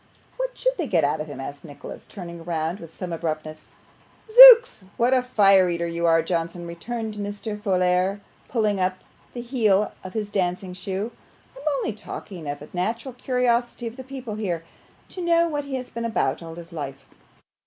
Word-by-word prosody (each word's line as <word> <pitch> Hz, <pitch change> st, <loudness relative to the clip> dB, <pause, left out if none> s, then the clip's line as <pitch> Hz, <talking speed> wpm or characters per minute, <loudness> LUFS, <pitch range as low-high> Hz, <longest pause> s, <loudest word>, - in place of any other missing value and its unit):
'What -, -, -3 dB
SHOULD -, -, +1 dB
they 325 Hz, -, -1 dB
get 175 Hz, -6 st, +2 dB
out 145 Hz, +2 st, +1 dB
of 155 Hz, -, -5 dB
him?' 145 Hz, -3 st, -8 dB
asked 140 Hz, +1 st, -7 dB
Nicholas, 145 Hz, -3 st, -10 dB
turning 170 Hz, -3 st, -9 dB
round 165 Hz, +2 st, -2 dB
with 165 Hz, -1 st, -12 dB
some 180 Hz, -2 st, -5 dB
abruptness. 155 Hz, -1 st, -4 dB, 0.6 s
'Zooks! 485 Hz, -, +10 dB
what 240 Hz, +2 st, +3 dB
a 255 Hz, -, +4 dB
fire 195 Hz, -7 st, +4 dB
eater 170 Hz, 0 st, -1 dB
you 170 Hz, 0 st, -1 dB
are, 165 Hz, -1 st, +4 dB
Johnson!' 170 Hz, 0 st, -3 dB
returned 215 Hz, +6 st, -5 dB
Mr. 205 Hz, +1 st, -5 dB
Folair, 185 Hz, 0 st, +1 dB, 0.3 s
pulling 215 Hz, -4 st, 0 dB
up 185 Hz, 0 st, 0 dB, 0.4 s
the 240 Hz, -, -4 dB
heel 215 Hz, -5 st, +2 dB
of 185 Hz, 0 st, -8 dB
his 210 Hz, -2 st, -3 dB
dancing 180 Hz, -1 st, -1 dB
shoe. 195 Hz, +4 st, -4 dB, 0.4 s
'I'm 275 Hz, +3 st, -9 dB
only 230 Hz, -, -2 dB
talking 190 Hz, -5 st, -8 dB
of 145 Hz, 0 st, -5 dB
the 150 Hz, -, -11 dB
natural 225 Hz, +8 st, -2 dB
curiosity 245 Hz, -1 st, 0 dB
of 230 Hz, 0 st, -5 dB
the 260 Hz, -, -8 dB
people 260 Hz, -4 st, -7 dB
here, 185 Hz, -6 st, -3 dB, 0.5 s
to 370 Hz, -, -7 dB
know 340 Hz, 0 st, +3 dB
what 290 Hz, -3 st, -3 dB
he 280 Hz, -1 st, -4 dB
has 255 Hz, -1 st, -6 dB
been 235 Hz, -, -5 dB
about 175 Hz, -13 st, 0 dB
all 165 Hz, -1 st, -8 dB
his 170 Hz, 0 st, -11 dB
life. 140 Hz, -4 st, -6 dB
195 Hz, 185 wpm, -24 LUFS, 170-240 Hz, 0.6 s, Zooks